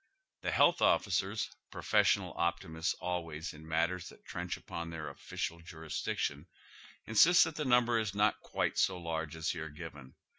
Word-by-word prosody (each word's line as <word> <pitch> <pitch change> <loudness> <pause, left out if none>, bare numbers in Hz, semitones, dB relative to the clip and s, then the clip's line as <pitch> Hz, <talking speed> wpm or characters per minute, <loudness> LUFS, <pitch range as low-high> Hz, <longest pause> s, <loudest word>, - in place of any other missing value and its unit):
The - - -1
health - - +4
officers, - - +2 0.2
professional 100 -3 +2
optimists 85 -1 -1
always 85 -3 -4
in 80 +1 -12
matters 85 +2 0
that - - -17
trench - - -4
upon 85 0 -6
their 80 -2 -5
official 85 +4 -5
jurisdiction, 80 -2 -3 0.6
insist 165 +11 +7
that 165 - -3
the 150 - -2
number 120 -2 +4
is 105 -3 -2
not 105 +1 +3
quite - - -1
so 95 - +2
large 80 -2 -3
as 80 +2 -1
here 80 -2 -5
given. 75 -4 -10
85 Hz, 150 wpm, -33 LUFS, 80-100 Hz, 0.6 s, insist